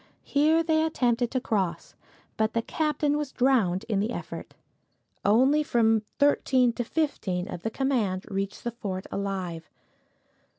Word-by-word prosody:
Here 310 +3 +3
they 315 -1 +2
attempted 245 -6 +1
to 260 - -1
cross, 190 -8 -2 0.4
but 220 0 0
the 230 - 0
captain 300 0 0
was 295 -3 -4
drowned 225 -7 +2
in 210 -4 0
the 210 +3 0
effort. - - -7 0.7
Only 260 +8 +4
from 225 -6 +2 0.2
thirteen 260 -4 +3
to 240 - -2
fifteen 210 - -2
of 170 - -6
the 225 - -2
command 220 -7 -1
reached 195 0 -4
the 240 - -2
fort 195 -5 -5
alive. 185 -5 -4
230 Hz, 140 wpm, -27 LUFS, 195-280 Hz, 0.7 s, Only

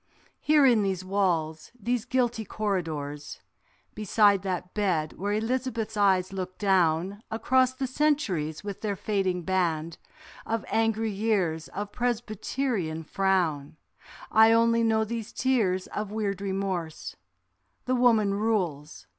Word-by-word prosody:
Here 300 -2 +4
in 240 -5 +5
these 190 -2 -2
walls, 170 -5 -1
these 235 +1 -1
guilty 245 -3 0
corridors, 160 -9 -4 0.5
Beside 205 -1 +3
that 180 -1 -4
bed 175 -7 0
where 200 +2 -3
Elizabeth's 225 0 -2
eyes 190 -2 +2
look 185 -1 -5
down; 190 0 +1
Across 255 +3 +2
the 265 0 -2
centuries 250 - 0
with 200 -2 -6
their 205 -2 -1
fading 190 -3 -1
band 170 -3 -1 0.4
Of 225 -1 -3
angry 225 0 +1
years 195 -6 0
of 205 +1 -6
Presbyterian 225 -6 -2
frown, 165 -6 0 0.5
I 220 +1 +6
only 230 0 +3
know 220 -1 +2
these 225 0 -5
tears 210 -8 +1
of 210 -1 -5
weird 200 -3 -2
remorse; 190 -5 -3 0.7
The 255 - 0
woman 230 -5 +3
rules. 185 -9 -2
200 Hz, 120 wpm, -27 LUFS, 180-225 Hz, 0.7 s, I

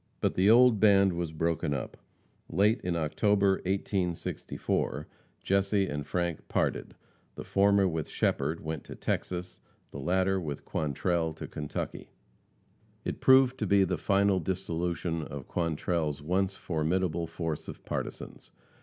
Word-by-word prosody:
But - - +1
the 95 +3 +3
old 120 -1 +6
band 100 -3 +5
was 85 -2 -3
broken 80 -2 -1
up. 65 - -5 0.5
Late 105 +7 +2
in 90 -1 -1
October, 95 +5 +2
1864, 90 -5 -2 0.4
Jesse 100 +1 +2
and 75 -4 -4
Frank 85 0 -2
parted, - - -1 0.4
the - - -6
former 100 0 +3
with 80 -4 -3
Shepherd 75 +4 0
went 80 -2 -4
to - - -8
Texas, 90 0 -3 0.3
the 70 - -7
latter 95 +5 +1
with 75 -4 -5
Quantrell 80 +2 -1
to - - -7
Kentucky. 75 -1 -5 1.0
It - - -4
proved 130 -1 +5
to 105 - -1
be 100 +1 +5
the 90 -3 -1
final 100 +3 +3
dissolution 85 -1 -2
of 70 -3 -7
Quantrell's 80 -2 -1
once 95 +4 0
formidable 85 +1 -1
force 80 -2 -4
of - - -9
partisans. - - -6
90 Hz, 135 wpm, -29 LUFS, 80-95 Hz, 1.0 s, old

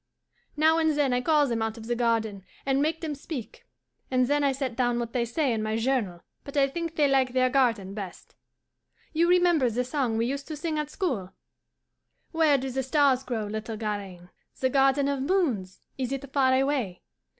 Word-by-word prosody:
Now 320 +2 +4
and 315 -1 +2
then 280 -4 +2
I 245 - +1
call 300 +2 +3
them 235 -4 -1
out 225 0 -2
of 225 - -9
the 240 +1 -1
garden 225 -4 0 0.2
and 270 0 +2
make 315 +2 0
them 315 -3 -3
speak, 275 -5 -8 0.4
and 255 -1 +2
then 290 +3 +1
I 280 - +3
set 265 -3 -3
down 245 -1 +1
what 235 -1 -3
they 240 -2 +1
say 260 +2 0
in 220 - -1
my 215 +1 -1
journal; 225 -8 -1 0.2
but 280 +1 -7
I 275 -1 +5
think 330 +3 -4
they 295 -2 +3
like 265 -2 +2
their 255 0 +2
garden 230 -8 +1
best. 195 -4 -8 0.8
You 335 +2 +3
remember 350 -7 +4
the 240 +2 -1
song 250 -3 -1
we 230 - +1
used 275 +3 -3
to 310 - -5
sing 310 0 -2
at 300 -1 -3
school? 245 - -3 1.0
"'Where 320 -4 +4
do 265 0 -4
the 265 +2 -1
stars 265 -1 +3
grow, 240 -5 -3
little 220 +1 -5
Garaine? 200 -5 -5 0.3
The 260 0 +1
garden 275 +1 +3
of 280 -1 -1
moons, 265 - 0 0.2
is 255 -1 -2
it 275 0 -5
far 260 -2 +4
away? 260 -9 0
260 Hz, 200 wpm, -27 LUFS, 230-290 Hz, 1.0 s, I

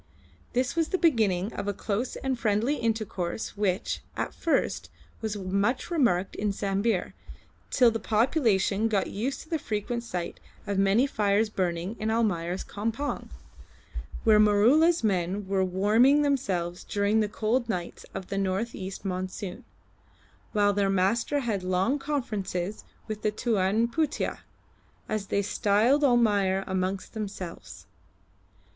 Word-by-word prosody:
This 255 +4 0
was 330 -2 +2
the 375 - 0
beginning 220 - +2
of 200 - -4
a 205 - -1
close 220 +6 -2
and 265 -2 -2
friendly 230 +6 +1
intercourse 215 -4 -2
which, 200 -2 -1 0.2
at - - -2
first, 330 - 0 0.3
was 215 -2 -2
much 200 - -1
remarked 215 - +1
in 210 0 0
Sambir, 200 0 -1 0.6
till 245 -3 +5
the 225 - -2
population 220 -3 +2
got 205 -4 0
used 240 +7 -2
to 315 - -15
the 320 - 0
frequent 230 +1 -3
sight 180 -7 -5 0.3
of 200 -2 -1
many 200 +6 +4
fires 210 -3 +1
burning 180 +1 -2
in 215 - -1
Almayer's 190 -6 0
campong, 225 +7 -3 0.9
where 215 -1 +6
Maroola's 235 +11 +5
men 190 -1 0
were 190 -1 +1
warming 215 +10 +4
themselves 190 -12 -1
during 205 +2 +1
the 210 -1 +1
cold 230 +3 0
nights 180 -5 -4
of 185 - -6
the 195 - -1
north 195 +4 -1
east 190 0 -7
monsoon, 185 0 -4 0.9
while 205 -1 +3
their 200 -1 +1
master 200 +9 +1
had 220 -6 -1
long 185 +9 +1
conferences 215 -9 -3 0.2
with 215 -1 -5
the 215 - +2
Tuan 215 0 +1
Putih 300 +5 -1 0.7
as 215 -2 -2
they 200 - 0
styled 215 +8 +2
Almayer 205 -7 +3
amongst 190 0 -2
themselves. 200 -5 -7
210 Hz, 135 wpm, -27 LUFS, 195-235 Hz, 0.9 s, where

